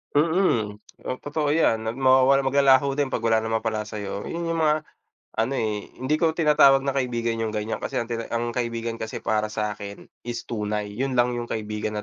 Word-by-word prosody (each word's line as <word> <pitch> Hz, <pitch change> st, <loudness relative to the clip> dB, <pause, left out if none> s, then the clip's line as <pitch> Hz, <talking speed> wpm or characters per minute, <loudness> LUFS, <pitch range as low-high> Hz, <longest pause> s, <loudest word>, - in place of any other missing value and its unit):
Mm. 145 Hz, -, +2 dB, 0.3 s
O, 130 Hz, -, -2 dB
totoo 145 Hz, +1 st, -2 dB
'yan 115 Hz, -8 st, +2 dB
at 115 Hz, -, -5 dB
mawawala, 130 Hz, +1 st, +5 dB
maglalaho 135 Hz, 0 st, +4 dB
din 145 Hz, -1 st, 0 dB
'pag 120 Hz, -, -3 dB
wala 110 Hz, -1 st, +3 dB
na 110 Hz, -, -3 dB
mapala 110 Hz, -1 st, -1 dB
sa'yo, 105 Hz, -1 st, -5 dB
yung 170 Hz, 0 st, -3 dB
mga 155 Hz, -1 st, +1 dB, 0.5 s
ano, 115 Hz, +4 st, +1 dB
eh, 105 Hz, -5 st, -2 dB, 0.2 s
hindi 145 Hz, +4 st, +2 dB
ko 165 Hz, -1 st, +2 dB
tinatawag 150 Hz, -4 st, +5 dB
na 135 Hz, -, 0 dB
kaibigan 120 Hz, -3 st, -1 dB
yung 110 Hz, -1 st, -2 dB
ganyan 105 Hz, +1 st, -2 dB
kasi -, -, -5 dB
ang 115 Hz, -, -5 dB
tina 115 Hz, -1 st, -3 dB
ang 120 Hz, 0 st, -1 dB
kaibigan 115 Hz, -1 st, -2 dB
kasi 110 Hz, 0 st, -5 dB
para 110 Hz, -1 st, +1 dB
sa 105 Hz, -1 st, -3 dB
akin, 100 Hz, 0 st, -8 dB, 0.2 s
is 120 Hz, -1 st, -4 dB
tunay, 105 Hz, -2 st, -3 dB
yun 130 Hz, +5 st, -2 dB
lang 120 Hz, 0 st, +3 dB
yung 120 Hz, -, -4 dB
kaibigan 105 Hz, -1 st, -3 dB
120 Hz, 195 wpm, -24 LUFS, 110-135 Hz, 0.5 s, mawawala